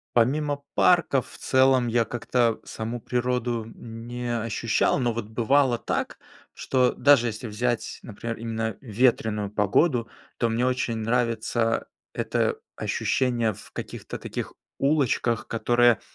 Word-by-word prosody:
Помимо 140 +4 +2
парков 170 -7 +3
в - - -12
целом, 130 -2 +3
я 115 0 +2
как-то 120 0 0
саму 115 +2 -5
природу 125 -1 -1
не 120 +1 -5
ощущал, 115 +3 +1
но 120 -2 +1
вот 115 -1 -4
бывало 120 +3 +2
так, - - -3 0.4
что 125 -2 +1
даже 140 -4 +5
если 115 +2 -5
взять, 120 +2 -2
например, 115 +1 -6
именно 110 -1 -3
ветреную 110 -3 +1
погоду, 115 - +2 0.3
то 115 - +1
мне 115 +2 +1
очень 125 -2 0
нравится 115 0 0 0.3
это - - 0 0.2
ощущение 120 -4 0
в - - -14
каких-то - - -7
таких - - -5 0.3
улочках, 135 -5 +1
которые 120 -1 +3
120 Hz, 125 wpm, -25 LUFS, 115-125 Hz, 0.4 s, даже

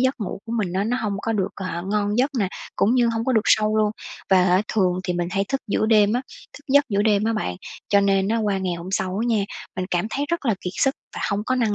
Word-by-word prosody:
giấc 260 +1 +2
ngủ 200 - -4
của 225 - -5
mình 210 -7 -1
á, 190 +2 0
nó 245 +3 0
hông 210 -2 -1
có 225 - -1
được, 195 -3 0
à, 180 -3 -4
ngon 210 +1 0
giấc 270 +3 +3
nè, 195 -4 +1 0.3
cũng 225 +5 +3
như 240 -2 +3
hông 225 0 -2
có 260 - +1
được 220 - +4
sâu 215 0 +3
luôn, 215 -1 +3 0.4
và, 185 -1 +6
a, 185 +2 +3
thường 185 -4 +1
thì 180 - -1
mình 175 0 -2
hay 195 +1 0
thức 270 0 -1
giữa 215 0 +1
đêm 210 -2 +4
á, 250 +2 0 0.3
thức 290 - -13
giấc 285 +2 +5
giữa 205 -2 +1
đêm 210 -1 +2
á 225 - +1
bạn. 90 - -2 0.3
Cho 200 -1 +4
nên 195 0 +2
á 225 - +1
qua 205 -3 0
ngày 185 -2 -2
hôm 170 +1 -7
sau 190 0 -1
á - - 0
nha, 215 -4 +2 0.3
mình 185 - -1
cảm 175 +2 0
thấy 285 +4 -2
rất 340 -5 -2
là 220 - +3
kiệt 180 - -4
sức 270 0 +2 0.2
và - - -4
hông 205 +1 -1
có 255 - +1
năng 230 -5 +1
210 Hz, 285 wpm, -23 LUFS, 190-230 Hz, 0.4 s, và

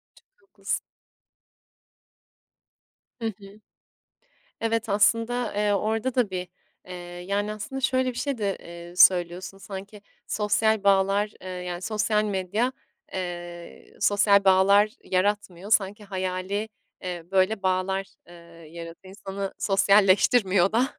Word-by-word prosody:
Çok - - -27
haklısın. - - -3 2.4
Hı 230 - -4
hı. 200 -1 -9 1.0
Evet, 225 0 -1
aslında, 230 +3 +2
eee, 210 0 +1
orada 220 +5 -1
da 245 -6 +1
bir, 180 -1 -4 0.4
eee, 180 - -8 0.3
yani, 205 +1 0
aslında 215 +6 -6
şöyle 260 0 +1
bir - - -10
şey 280 -4 -2
de, 200 -3 -1
eee, 170 +1 -11
söylüyorsun 180 +1 +4
sanki 195 +2 -9 0.3
sosyal 215 0 +1
bağlar, 200 +1 +3
eee, 185 - -8
yani, 180 -1 -5
sosyal 215 0 +1
medya, 205 +5 -1 0.4
eee, 175 -2 -7
sosyal 200 0 +4
bağlar 195 +2 +5 0.2
yaratmıyor 195 0 -1
sanki 205 0 +1
hayali, 190 +2 -3 0.3
eee, 175 -3 -5
böyle 195 +2 +2
bağlar, 190 +1 0 0.2
eee, - - -14 0.4
yaratıyor, 170 +3 -10
insanı 195 -1 -5
sosyalleştirmiyor 195 0 +4
da. 245 +4 +2
200 Hz, 115 wpm, -25 LUFS, 185-215 Hz, 2.4 s, bağlar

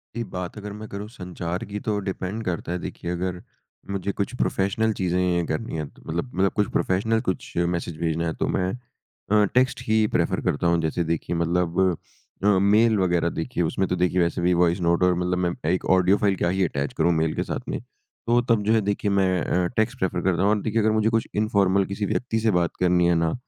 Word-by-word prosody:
जी 115 - -2
बात 90 +3 -5
अगर 105 0 -6
मैं 110 +1 -8
करूँ 100 +1 -5
अगर - - -12
संचार 90 -3 -5
की 105 +1 -5
तो 105 0 -1
डिपेंड 95 +3 -4
करता 85 -2 -3
है 90 - -1
देखिए 85 - -5
अगर 90 0 -3 0.5
मुझे 100 0 -2
कुछ 100 +4 -3
प्रोफेशनल 105 +3 +1
चीज़ें 90 -2 0
करनी 80 +3 -3
है 75 - -2
तो - - -21
मतलब 85 +10 -3
मतलब 95 +1 +2
कुछ 105 -2 +1
प्रोफेशनल 110 +5 +1
कुछ 95 - -3 0.2
मैसेज 85 -2 -5
भेजना 85 0 -1
है 80 - -1
तो - - +1
मैं 90 - 0 0.6
अ, 105 -1 +5
टेक्स्ट 125 +1 +2
ही 110 0 +3
प्रेफर - - +1
करता 85 +4 0
हूँ। 85 -1 +2
जैसे 80 +2 -1
देखिए 85 +1 -2
मतलब 85 +1 0 0.6
अ, - - +3
मेल 105 +3 +4
वगैरह 85 -2 +2
देखिए 90 0 -1
उसमें 95 +4 0
तो 90 - 0
देखिए 90 0 +1
वैसे 85 0 0
भी 90 +1 +3
वॉइस 85 +1 +2
नोट 85 +1 +2
और 90 0 +4
मतलब 90 0 0
मैं - - 0 0.2
1 90 - -1
ऑडियो 95 +2 +4
फाइल 100 -2 +2
का 85 - +2
ही 95 +1 +1
अटैच 70 -4 -3
करूँ 85 - +3
मेल 80 0 +1
के - - 0
साथ - - -3
में। - - -2 0.5
तो 120 +1 +4
तब 110 -3 +3
जो 110 - +2
है 110 - +4
देखिए 100 0 -1
मैं 95 -2 +2
अ, 90 0 +1
टेक्स्ट 120 +4 +1
प्रेफर 90 -1 -1
करता 90 -1 +1
हूँ 100 - +3
और 105 -1 +1
देखिए 110 +1 0
अगर 110 - +3
मुझे 110 +1 +2
कुछ 115 -1 0
इनफ़ॉर्मल 100 -3 +2
किसी 100 +2 -3
व्यक्ति 115 +2 -1
से 110 0 +2
बात 85 - -2
करनी 90 -1 +3
है 85 - +3
ना 80 - 0
95 Hz, 225 wpm, -24 LUFS, 85-105 Hz, 0.6 s, अ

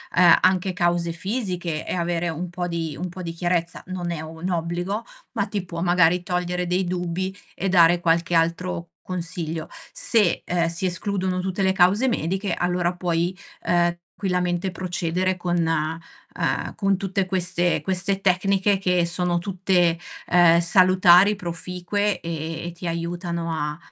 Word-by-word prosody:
ehm, 175 -1 +7
anche 185 0 +2
cause 175 -1 +1
fisiche 180 -4 -3
e - - -2
avere 175 0 -1
un 170 +2 -4
po' 175 0 -3
di 165 -3 -3
un 180 +1 -3
po' 185 +1 -8
di 170 -1 -5
chiarezza. 175 0 -1
Non 180 -1 -4
è 160 -2 -4
un 160 +3 -6
obbligo, 175 +5 -2 0.3
ma 205 -4 0
ti 205 -2 -3
può 170 -1 -6
magari 175 0 +3
togliere 180 0 -1
dei 180 +2 +1
dubbi 180 +1 -3 0.2
e 195 - -2
dare 175 -1 +5
qualche 170 0 +1
altro 165 - 0 0.2
consiglio. 170 -3 -4 0.2
Se, 215 -7 +2
ehm, 175 -1 +1
si 170 +3 -2
escludono 185 0 -1
tutte 190 +1 -3
le 190 0 +3
cause 190 +7 +4
mediche 195 -3 -1
allora 180 0 0
puoi, 175 0 -1 0.3
ehm, 175 0 +2 0.2
tranquillamente 180 -1 -1
procedere 180 +1 -1
con, 175 -1 -1
ehm, 165 +1 -3
con 195 -2 +1
tutte 195 0 -1
queste 180 -2 0
queste 190 +1 0
tecniche 195 +1 +2
che 180 -2 +2
sono 175 0 0
tutte, 180 -2 +1 0.3
ehm, 170 -1 +5
salutari, 185 +2 +5
proficue 180 +2 -2
e 165 0 -4
e - - -4
ti 175 +1 -7
aiutano 170 0 -3
a 150 -1 -3
175 Hz, 150 wpm, -23 LUFS, 170-185 Hz, 0.3 s, ehm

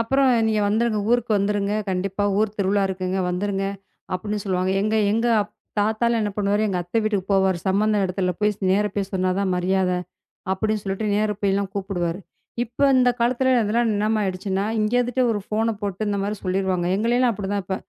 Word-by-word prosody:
அப்புறம் 270 +4 +2 0.2
"நீங்க 215 -1 +1
வந்துருங்க, 220 0 +1
ஊருக்கு 240 -2 +2
வந்துருங்க, 205 0 0 0.2
கண்டிப்பா 195 +2 -1
ஊர் 215 -1 0
திருவிழா 200 0 +1
இருக்குங்க 185 0 -2
வந்துருங்க" 195 +1 -1 0.5
அப்பிடின்னு 205 +2 -3
சொல்லுவாங்க. 185 -1 0
எங்க, 215 +1 +1 0.2
எங்க 230 +2 +1 0.5
தாத்தாலாம் 220 +2 +1
என்ன 210 - -1
பண்ணுவாரு, 205 +1 +1
எங்க 185 -2 -1
அத்த 175 +6 -5
வீட்டுக்கு 205 -3 -1
போவாரு. 190 -2 +2
சம்பந்த 210 +2 +2
இடத்துல 185 0 -1
போயி 210 0 +3 0.2
நேரா 210 +2 +2
போயி 200 -2 -1
சொன்னாதான் 185 +1 0
மரியாதை 180 0 +1 0.6
அப்பிடின்னு 215 +2 -1
சொல்லிட்டு 195 +2 -3
நேரா 210 0 +1
போயி 200 -1 +2
எல்லாம் 200 -1 -1
கூப்பிடுவாரு. 185 -3 -2 0.4
இப்ப 245 +4 0
இந்தக் 250 -1 +3
காலத்துல 255 +2 +2
இதெல்லாம் 225 +2 +1
என்னமா 215 +1 +1
ஆயிடுச்சுன்னா, 190 +1 -2
இங்க 215 +2 0
இருந்துட்டு 245 +1 +1
ஒரு 205 - -1
ஃபோன 225 +1 0
போட்டு, 200 0 -4
இந்த 200 - -1
மாரி 210 +1 -2
சொல்லிருவாங்க. 185 -1 0
எங்களை 230 +4 +1
எல்லாம் 250 -2 +3
அப்பிடித்தான் 200 -1 -3
இப்ப. 190 - -2
205 Hz, 175 wpm, -23 LUFS, 190-220 Hz, 0.6 s, போயி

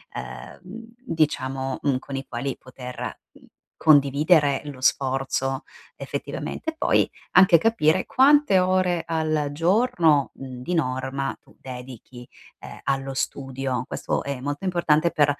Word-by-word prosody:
ehm, 65 -1 -8 0.4
diciamo, 135 - -1
mh, 140 -3 +1
con 135 +1 -7
i 135 - -4
quali 130 +2 -4
poter, 125 -1 -8
uhm, - - -19 0.4
condividere 145 0 +4
lo 140 -3 -8
sforzo 135 +1 0 0.3
effettivamente. 320 0 -5
Poi, - - +2 0.2
anche 180 -2 +7
capire 185 -3 +2
quante 270 -7 +5
ore 180 -2 +1
al 155 -3 -1
giorno, 165 - +2
di 130 +5 -6
norma, 130 -2 -1
tu - - -22
dedichi, 125 -1 -10 0.3
ehm, - - -10
allo 135 0 -1
studio. 130 -2 -3
Questo - - -3
è 140 -2 -4
molto 145 +6 -4
importante, 170 -3 +2
mhmm, 150 - +4
140 Hz, 120 wpm, -24 LUFS, 130-170 Hz, 0.4 s, anche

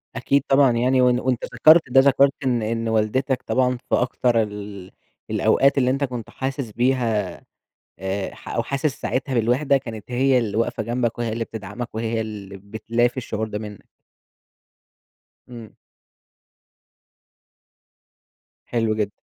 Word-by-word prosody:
أكيد 135 +4 +1
طبعًا 135 -1 +5
يعني، 125 +2 +2
وأن 125 -1 +3
وأنت 125 -2 -1
ذكرت 155 +7 +7
ده، 135 - +6
ذكرت 140 0 +4
إن 125 -3 +1
إن 115 +1 -2
والدتك 120 +5 0
طبعًا 125 -1 +1
في - - +3
أكتر 120 -1 +1
ال 105 -3 -8 0.4
الأوقات 140 +1 +3
اللي 130 -2 +3
أنت 135 +2 0
كنت 125 -4 -4
حاسس 130 -3 -4
بيها، 115 -6 0 0.6
آآ، 95 +1 -3
ح - - -11
أو 115 - -1
حاسس 140 +2 -2
ساعتها 135 +1 -2
بالوحدة، 125 +5 +2
كانت 115 -3 -9
هي 130 +1 +3
اللي 110 -3 -2
واقفة 115 -1 -1
جنبك، 120 +1 -1
وهي 115 -2 -1
اللي 115 +1 -2
بتدعمك 110 +3 -7
وهي 115 0 -1
اللي 100 -3 -7
بتلافي 115 +5 -1
الشعور 110 -3 -3
ده 105 -1 -5
منك. 105 -2 -10 1.6
إمم. 115 -4 -11 2.9
حلو 115 -2 0
جدًا. 105 -2 -3
120 Hz, 135 wpm, -22 LUFS, 110-130 Hz, 2.9 s, ذكرت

